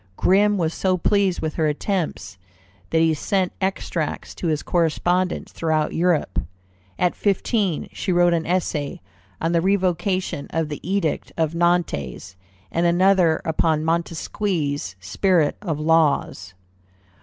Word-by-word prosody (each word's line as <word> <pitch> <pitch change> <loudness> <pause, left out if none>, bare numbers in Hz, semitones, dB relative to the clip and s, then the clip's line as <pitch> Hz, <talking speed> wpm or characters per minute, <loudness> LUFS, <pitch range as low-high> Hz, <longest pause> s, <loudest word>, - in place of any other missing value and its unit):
Grimm 205 +2 +3
was 165 -3 0
so 185 -1 +1
pleased 195 0 +1
with 155 -1 -2
her 160 -2 +2
attempts, 155 - -3 0.5
that 160 - +2
he 165 -1 +3
sent 185 +4 0
extracts 185 -4 -2
to 175 - -4
his 155 -2 0
correspondents 175 +2 0
throughout 155 -2 0
Europe. 175 -2 +1 0.6
At 180 -1 +2
fifteen 200 -3 0
she - - -2
wrote 175 0 +4
an 165 -1 -1
essay 165 -5 -1 0.4
on 165 - 0
the 170 -1 +2
Revocation 185 -4 0
of 160 -2 -1
the 150 - -5
Edict 185 -3 -1
of 160 -1 0
Nantes, 165 - -1 0.4
and 170 +1 +1
another 175 -2 +3
upon 160 -1 +1
Montesquieu's 165 - -2
Spirit 155 - +1
of 165 -7 -3
Laws. 150 - +1
170 Hz, 130 wpm, -22 LUFS, 155-185 Hz, 0.6 s, wrote